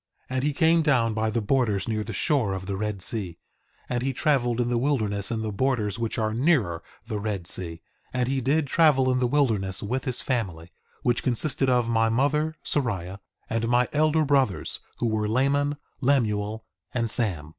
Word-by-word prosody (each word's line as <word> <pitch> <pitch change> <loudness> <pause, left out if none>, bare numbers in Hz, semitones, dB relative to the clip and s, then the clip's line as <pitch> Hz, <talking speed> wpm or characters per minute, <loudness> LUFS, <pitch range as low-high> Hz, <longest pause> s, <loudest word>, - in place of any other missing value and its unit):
2:5 - - -2
And 130 - 0
he 150 0 +1
came 165 +2 +4
down 125 -7 +2
by 110 0 0
the 115 +1 -1
borders 110 -4 +1
near 110 -1 -1
the - - -6
shore 130 - +1
of 95 0 -6
the 100 0 -3
Red 105 -1 -3
Sea; 95 -7 -4 0.5
and 120 -1 -1
he 135 +1 -1
traveled 125 -4 +1
in 120 -1 +1
the 120 -1 +1
wilderness 110 -7 0
in 115 -2 -2
the 110 - -2
borders 110 -2 0
which 115 -1 -2
are 110 -1 0
nearer 115 - +2 0.2
the 110 -2 -3
Red 100 -4 -3
Sea; 85 -2 -5 0.3
and 125 -1 0
he 135 0 0
did 145 +5 +2
travel 135 -3 +4
in 125 - +1
the 125 - +2
wilderness 110 -9 +1
with 125 +6 -2
his 125 -2 -1
family, 90 - -2 0.3
which 120 -1 +2
consisted 130 +2 +1
of 125 -2 +2
my 115 -1 +2
mother, 150 +6 +1
Sariah, 100 - -1 0.3
and 115 0 -1
my 120 +1 +3
elder 155 +1 +3
brothers, 135 -8 +1 0.2
who - - -1
were 110 -2 0
Laman, 140 +5 +1 0.2
Lemuel, 110 -5 +1 0.3
and 115 -2 0
Sam. 90 -11 0
120 Hz, 190 wpm, -26 LUFS, 105-135 Hz, 0.5 s, came